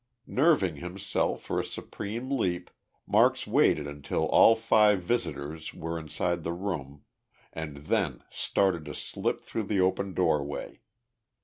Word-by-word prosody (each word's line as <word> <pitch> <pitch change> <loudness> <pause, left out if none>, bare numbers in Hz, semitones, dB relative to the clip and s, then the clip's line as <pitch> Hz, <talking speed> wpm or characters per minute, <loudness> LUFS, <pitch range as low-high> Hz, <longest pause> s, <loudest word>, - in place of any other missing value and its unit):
Nerving 130 - +2
himself 90 +5 -2
for - - -1
a - - 0
supreme 115 +6 -6
leap, 90 -9 -1 0.3
Marks - - +3
waited 75 - +3
until 70 -1 -2
all 115 - +6
five 105 -3 +4
visitors 80 -7 -3
were 80 0 -4
inside 85 +2 -2
the 85 +1 -3
room, 75 -7 -5 0.5
and 80 -3 -6
then 75 - -1
started 95 -5 +1
to - - -7
slip - - -2
through 110 - -4
the 100 0 0
open 95 +1 +1
doorway. 75 -5 -1
90 Hz, 130 wpm, -28 LUFS, 75-100 Hz, 0.5 s, all